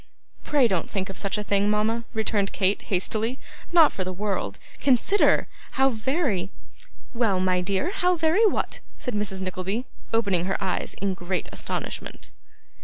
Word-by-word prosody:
'Pray 285 -5 +3
don't 185 -6 -1
think 190 -1 -2
of - - -11
such 200 +1 0
a 210 - -2
thing, 205 0 +2
mama,' 220 +2 +1
returned 215 -2 0
Kate, 195 +1 +1
hastily; 220 +6 0 0.3
'not 330 -4 +6
for 190 - -2
the 185 - -4
world. 200 +2 -2 0.2
Consider. 280 - +3 0.3
How 270 0 +4
very 230 - -1 0.3
' - - -25
'Well, 225 -6 +1
my 185 -1 +2
dear, 195 - 0
how 360 -2 +2
very 330 +6 +3
what?' - - -1 0.2
said 250 - -4
Mrs. 205 -2 -2
Nickleby, 190 +5 -3 0.3
opening 200 -6 +2
her 195 - 0
eyes 190 - -2
in 195 -1 -1
great 180 -1 -3
astonishment. - - -5
210 Hz, 160 wpm, -25 LUFS, 190-250 Hz, 0.3 s, not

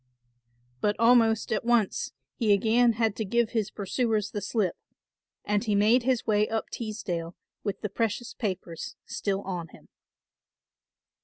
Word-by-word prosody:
But 205 +6 +1
almost 230 -2 +4
at - - -1
once 240 - +1 0.2
he 220 -4 +3
again 230 +4 +4
had 220 -2 +1
to 220 - -1
give 235 +2 +1
his 215 -3 0
pursuers 215 +1 -1
the 205 - -3
slip, 200 -3 0 0.7
and 205 +1 +1
he 215 -3 +1
made 215 +5 +5
his 255 -1 +1
way 210 -1 +2
up 225 0 -2
Teesdale 180 -7 -4 0.3
with 200 -2 -3
the 210 - -2
precious 225 +3 -2
papers 185 -6 -4
still 195 -1 -2
on 180 -3 -4
him. - - -18
215 Hz, 145 wpm, -28 LUFS, 200-230 Hz, 0.7 s, made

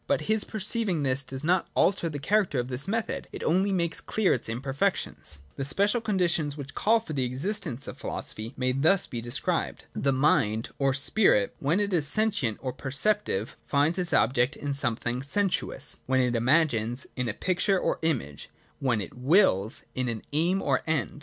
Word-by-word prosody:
But - - +1
his 215 -1 +2
perceiving 210 -6 +1
this 135 +1 +2
does 130 +1 -5
not 175 +3 +1
alter 180 -3 +2
the 150 - -5
character 185 +1 +1
of 125 +1 -3
this 130 +6 -2
method; 225 +2 -2
it - - -7
only 190 +5 +2
makes 170 -3 -1
clear 215 -3 +1
its 120 - -4
imperfections. 130 - -2
ll.j - - -22 0.2
The 135 - -2
special 205 - +1
conditions 175 -8 0
which 145 0 -8
call 225 +2 +3
for 190 -8 -8
the 135 -3 0
exist 170 - -1
ence 125 +3 -1
of - - -8
philosophy 110 +2 -5
may 130 0 0
be 135 +2 -2
thus 180 +5 +3
described. 120 -1 -3
The 140 - 0
mind 130 -5 +1
or 135 -1 +2
spirit, 135 - +4
when 155 +8 +1
it 205 -1 -1
is 155 -4 +2
sentient 205 - +2
or 130 -1 -3
perceptive, 135 - +1
finds 150 +5 +1
its 180 -1 +1
object 125 +1 +2
in 145 -1 -4
something 120 -2 -2
sensuous; 175 -2 -1
when 130 0 +2
it 125 -1 +1
imagines, 120 -2 +1
in 125 -2 -2
a 105 - -4
picture 185 +1 +1
or - - -1
image; 125 - -3 0.3
when 120 -6 0
it 95 - -8
wills, 125 - +2
in 130 -1 -2
an 115 -2 -5
aim 175 +6 +1
or - - +1
end. 155 -1 -1
145 Hz, 185 wpm, -27 LUFS, 125-185 Hz, 0.3 s, spirit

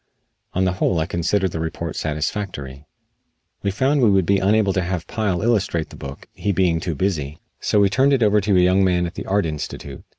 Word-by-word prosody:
On 95 +1 +2
the 90 - +2
whole 90 0 0
I 80 - 0
considered 95 +3 0
the 80 - -4
report 80 +1 -4
satisfactory. 75 -3 -4 0.8
We 100 - 0
found 130 +8 +1
we 115 - +5
would 95 -3 +3
be 100 +2 +3
unable 100 0 +2
to 95 - +1
have 90 -1 -3
Pyle 105 -5 -1
illustrate 100 -8 0
the - - -10
book, 70 0 -9
he 105 - -1
being 90 -3 +2
too 85 -2 -3
busy, 75 -4 -2 0.2
so 105 - +1
we 100 - +5
turned 135 +8 +3
it 135 -4 +3
over 105 0 +4
to 100 -1 +2
a - - +5
young 90 +2 +4
man 90 -2 +2
at 85 - -5
the - - -7
Art 100 0 +1
Institute. 75 -2 -6
95 Hz, 220 wpm, -21 LUFS, 85-100 Hz, 0.8 s, we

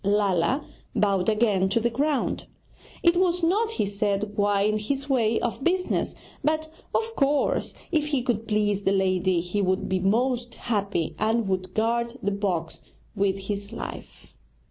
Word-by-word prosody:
Lala 200 - +2 0.3
bowed 195 -2 +2
again 210 -4 +2
to 215 - +2
the 235 +1 0
ground. 285 +3 0 0.6
'It 340 0 +5
was 360 -1 +2
not,' 430 +7 +2
he 450 - 0
said, 200 0 -1
'quite 205 0 +2
in 215 0 +1
his 275 +6 -2
way 230 -5 +2
of 240 +3 -2
business; 365 +3 0 0.3
but 315 +1 0 0.3
of 455 0 0
course, 285 0 +1 0.2
if 305 -3 +1
he 280 -5 0
could 225 -3 -1
please 210 -2 +1
the 195 - +1
lady, 185 -2 +2
he 180 +4 -2
would 185 -1 0
be 190 0 0
most 240 +5 +1
happy, 200 -7 -1
and 220 0 +1
would 185 -1 -2
guard 235 +2 0
the 200 - +1
box 185 -5 -2 0.3
with 195 0 +1
his 200 -1 -3
life.' - - -8
215 Hz, 160 wpm, -26 LUFS, 195-265 Hz, 0.6 s, It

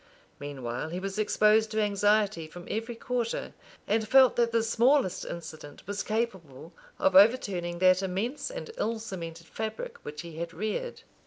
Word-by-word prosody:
Meanwhile 135 -1 -5
he 175 +3 -4
was 195 +2 -4
exposed 215 +1 +3
to 215 0 -1
anxiety 205 -4 +2
from 175 +2 -11
every 225 +2 -3
quarter; 240 0 -3 0.3
and 220 +1 0
felt 260 +1 +6
that 235 -1 +2
the 230 -1 +2
smallest 235 -2 +2
incident 155 -3 -9
was 200 +1 -3
capable 190 - -4 0.2
of 190 - +2
overturning 190 -5 +4
that 185 +1 +4
immense 200 - -2
and - - -7
ill 230 +1 0
cemented 170 -6 -7
fabric 220 +5 -5
which 150 0 -7
he 165 -2 -10
had 170 0 -5
reared. 220 - -3
205 Hz, 155 wpm, -28 LUFS, 170-225 Hz, 0.3 s, felt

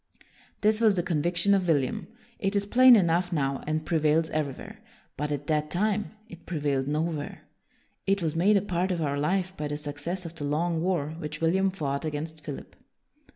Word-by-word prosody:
This 215 +1 +3
was 215 -3 +5
the 175 - 0
conviction 175 +3 +2
of 190 -2 +2
William. 145 -6 0 0.3
It 195 +1 -1
is 200 0 +1
plain 250 +4 +7
enough 175 -2 +2
now, 140 -4 -1
and 155 0 -1
prevails 160 0 +2
everywhere. 155 - -4 0.4
But 150 0 -3
at 145 -1 -3
that 150 0 0
time, 210 +4 0
it 175 -5 -13
prevailed 145 -5 -1
nowhere. 155 0 -2 0.6
It 195 -2 +2
was 160 -1 -1
made 200 +5 +4
a 195 - 0
part 185 -1 -1
of 175 - -1
our 140 -1 -1
life 185 +4 0
by 150 -3 -3
the 145 0 -3
success 150 +5 -5
of 165 - -7
the 165 -3 -7
long 160 +3 0
war 175 -5 0
which 155 -1 -6
William 190 +4 +2
fought 145 -7 -3
against 155 0 -5
Philip. 140 0 -8
165 Hz, 185 wpm, -27 LUFS, 150-190 Hz, 0.6 s, plain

